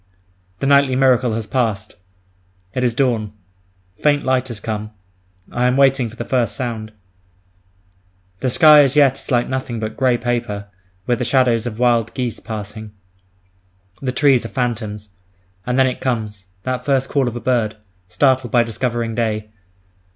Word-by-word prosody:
The - - 0
nightly 140 -2 +4
miracle 130 -3 +3
has 115 -1 -3
passed. 110 -4 -2 0.8
It 125 - -1
is 120 -2 +1
dawn. 115 -6 0 0.7
Faint 145 -1 +2
light 130 -1 +1
has 120 -4 -7
come. 105 0 -4 0.6
I 125 +1 +1
am 125 +1 +1
waiting 135 -3 +3
for 110 - -13
the 120 - -5
first 120 -5 0
sound. 115 -3 -4 1.5
The 130 - 0
sky 150 +3 +7
as 135 0 0
yet 140 -2 +4
is - - -10
like 120 -2 +2
nothing 130 -3 -3
but 110 0 -4
grey 130 -2 +2
paper, 115 -4 -3 0.4
with 120 -1 0
the - - 0
shadows 125 -2 +2
of 110 -2 -6
wild 120 -2 +1
geese 125 -3 -3
passing. 110 -1 -7 1.1
The 130 -2 -1
trees 135 -1 +3
are 115 - -6
phantoms. 110 -5 -3 0.6
And 125 +1 0
then 130 - +5
it 130 -1 -2
comes—that 110 0 -4
first 135 -1 +1
call 140 -3 0
of 120 - -3
a - - -3
bird, 115 -4 0 0.3
startled 130 +4 +1
at 120 -1 +5
discovering 115 0 -2
day! 110 -2 -2
120 Hz, 160 wpm, -19 LUFS, 110-130 Hz, 1.5 s, sky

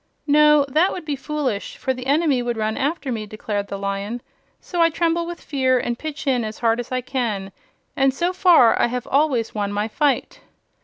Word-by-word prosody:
"No; 300 0 +5
that 315 +7 +2
would 355 - -6
be 295 -2 -2
foolish, 270 -6 -3
for 260 - -1
the 255 0 -7
enemy 285 -2 +2
would 240 -1 -2
run 220 0 -1
after 285 -1 -2
me," 215 -3 -4
declared 205 -1 -4
the 200 - -5
Lion. 200 +4 -4 0.4
"So 350 -2 -3
I 330 - +5
tremble 335 +1 0
with 345 0 -6
fear 260 -3 +1
and 240 -1 -2
pitch 310 0 -6
in 255 -4 +1
as 215 0 -5
hard 230 0 +1
as 245 - -6
I 255 0 0
can; 230 -7 -3 0.4
and 270 0 +3
so 345 +7 -1
far 350 - +5
I - - +4
have 250 0 -4
always 275 -5 +1
won 205 -2 -2
my 205 +1 -1
fight." 285 +4 -1
260 Hz, 205 wpm, -22 LUFS, 225-300 Hz, 0.4 s, No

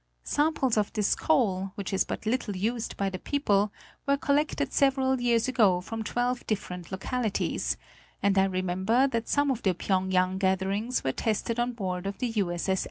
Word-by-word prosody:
Samples 290 -6 +1
of 210 -1 +1
this 210 -2 +2
coal, 195 -10 +1
which 200 -1 -5
is 190 - +2
but - - -5
little 220 -3 -1
used 225 +5 -2
by 200 - 0
the 185 - -5
people, 210 -8 +1 0.4
were 280 0 +3
collected 285 -1 0
several 265 -2 +2
years 235 -1 +2
ago 210 -8 +4
from 225 +5 -5
twelve 245 +3 -1
different 180 -4 -4
localities, 215 +3 -1 0.4
and 200 -1 +2
I 190 0 +5
remember 190 +6 +1
that 230 -2 -2
some 285 -1 +2
of 245 -3 -2
the 190 -3 +1
Phyéng 190 +1 0
yang 185 0 +2
gatherings 195 +5 0
were 130 - +1
tested 225 - -1
on 240 +1 0
board 190 -3 -3
the - - -2
U. 215 -3 +1
8S. 175 +1 -3
8S. 190 -1 +2
215 Hz, 180 wpm, -28 LUFS, 190-250 Hz, 0.4 s, I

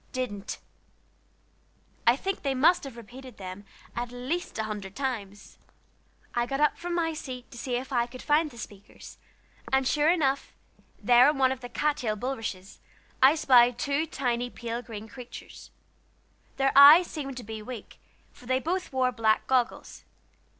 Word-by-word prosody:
"Didn't." 215 -6 -4 1.5
I 235 - +7
think 390 +8 -3
they 275 -2 -1
must 310 +5 +4
have 260 -4 -9
repeated 250 +3 -12
them 190 +1 -8 0.3
at 240 0 -4
least 255 +8 -4
a 220 - -1
hundred 205 -3 -6
times. 210 -7 -5 0.7
I 240 0 0
got 275 +1 -2
up 300 0 +3
from 345 0 -4
my 325 -1 0
seat 255 -5 -8
to - - -11
see 250 0 -2
if 260 +2 -4
I 240 -1 +2
could 255 +1 -11
find 305 +1 +2
the 240 - -15
speakers; 205 -2 -11 0.5
and 265 -1 +2
sure 300 +2 +3
enough, 280 -6 +1 0.5
there 245 +2 +6
on 300 - -1
one 260 -1 +3
of 265 - -3
the 245 -1 -8
cat 295 +3 0
tail 220 -6 -2
bulrushes, 220 -5 -5 0.4
I 270 +4 +7
spied 245 -5 +5
two 285 +4 -1
tiny 245 -4 -2
pale 235 0 -5
green 220 -2 -9
creatures. 245 +2 -11 0.9
Their 270 0 +2
eyes 295 +6 +10
seemed 275 -6 -6
to 245 - -6
be 220 0 -7
weak, 225 -1 -9 0.3
for 245 - -17
they 260 0 +2
both 360 +5 -3
wore 260 -1 +1
black 220 -2 +1
goggles. 255 -2 -1
255 Hz, 165 wpm, -27 LUFS, 235-280 Hz, 1.5 s, eyes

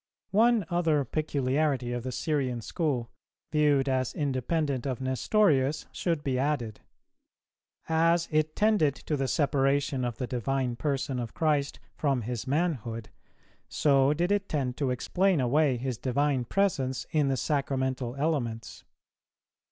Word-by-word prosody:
One 225 0 +4
other 160 -5 +2
peculiarity 140 -2 0
of 120 - -2
the 130 +2 -4
Syrian 130 -2 -1
school, 130 - -2 0.4
viewed 145 -3 +3
as 130 -2 0
independent 140 -1 -1
of 130 -3 -2
Nestorius, 135 - +2
should 165 -4 -2
be 130 -3 0
added: 130 -6 -1 1.1
As 165 +1 +2
it 155 0 +1
tended 205 -10 +3
to 150 - -3
the 135 -2 -1
separation 140 -2 +1
of 120 -2 -3
the 130 - -2
Divine 125 +1 -1
Person 135 0 -2
of 120 -2 -5
Christ 150 -3 0
from 135 -5 0
His 120 +1 -4
manhood, 130 -7 -1 0.6
so 140 -2 +3
did 175 +5 0
it 205 -1 0
tend 130 -5 -1
to 140 -3 0
explain 180 +8 +1
away 135 +1 +2
His 125 -1 -4
Divine 135 0 0
Presence 135 -7 0
in 150 -3 +2
the 135 -1 0
Sacramental 130 -3 -1
elements. 135 -7 -2
140 Hz, 135 wpm, -28 LUFS, 130-155 Hz, 1.1 s, One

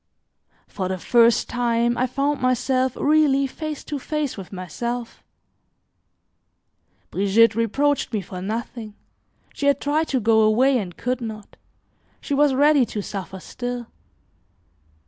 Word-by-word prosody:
For 190 -2 -4
the 190 0 -2
first 235 +4 +3
time, 240 -1 0
I 255 +2 0
found 275 +3 -1
myself 255 0 +1
really 290 -2 +3
face 305 +2 -6
to 290 -2 -5
face 300 0 -3
with 195 -3 -9
myself; 230 +6 -5 1.9
Brigitte 200 +4 +4
reproached 260 +7 0
me 215 -3 -1
for 180 0 -8
nothing; 220 +1 -5 0.6
she 285 - -2
had 280 -1 +3
tried 305 +2 0
to 265 - 0
go 220 0 +3
away 245 +5 +3
and 180 -5 -7
could 250 +1 -2
not; 220 -2 -7 0.6
she - - -4
was 285 -1 +3
ready 290 0 +5
to 210 - -4
suffer 190 -1 -6
still. 245 +3 -6
245 Hz, 130 wpm, -22 LUFS, 215-275 Hz, 1.9 s, ready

